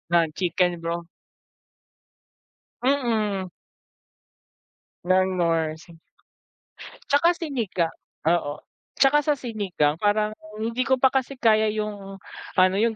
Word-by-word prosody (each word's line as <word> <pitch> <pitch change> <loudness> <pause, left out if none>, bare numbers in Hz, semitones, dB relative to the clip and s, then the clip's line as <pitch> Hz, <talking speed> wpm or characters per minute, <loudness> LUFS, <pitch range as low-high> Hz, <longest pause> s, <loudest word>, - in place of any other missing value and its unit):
ng 165 -1 +4
chicken 180 -1 0
broth 170 +1 -3 1.8
Mm. 220 -8 0 1.6
Ng 185 +1 +2
Knorr 165 -3 +1
si. 165 +1 -16 1.1
At - - -36
saka 290 +4 +5
Sinigang 230 - -2 0.3
oo 155 -4 0
at - - -51
saka 280 +2 +5
sa 300 - +4
Sinigang 200 - -1
parang 210 +1 +2 0.2
hindi 230 +4 -1
ko 265 - +4
pa 265 - +6
kasi 265 +1 -1
kaya 220 -3 +3
yung 210 -2 -4 0.4
ano 185 0 +4
yung 225 0 +2
205 Hz, 110 wpm, -24 LUFS, 175-240 Hz, 1.8 s, pa